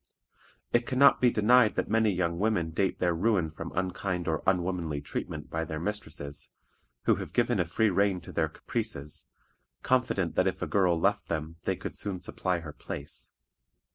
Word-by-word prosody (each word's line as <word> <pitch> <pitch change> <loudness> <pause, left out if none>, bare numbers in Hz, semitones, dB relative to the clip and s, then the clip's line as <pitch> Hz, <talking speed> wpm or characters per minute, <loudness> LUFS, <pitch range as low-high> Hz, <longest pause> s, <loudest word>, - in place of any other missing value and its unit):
It 120 0 +3
can 130 - -2
not 140 +1 +6
be 125 - +6
denied 110 +1 +5
that - - 0
many 110 -1 +3
young 85 -2 -1
women 100 -6 +1
date 95 +4 0
their 90 -1 +2
ruin 90 -2 +1
from 80 +1 -7
unkind 90 -1 -2
or 80 -2 0
unwomanly 90 -5 0
treatment 75 +1 -5
by 80 0 -1
their 80 -1 -4
mistresses, 85 -7 -4 0.5
who - - +3
have - - -6
given 120 -3 +2
a 90 - +2
free 105 +5 +2
rein 100 0 +2
to - - -10
their 80 -2 0
caprices, 75 -1 -4 0.5
confident 125 -9 +1
that 95 - +2
if 95 0 -2
a - - +1
girl 90 -4 +2
left - - +1
them 80 0 -3
they - - +1
could - - -6
soon 100 -3 -4
supply 90 -1 -2
her 80 -2 -8
place. 70 0 -5
90 Hz, 180 wpm, -29 LUFS, 80-105 Hz, 0.5 s, not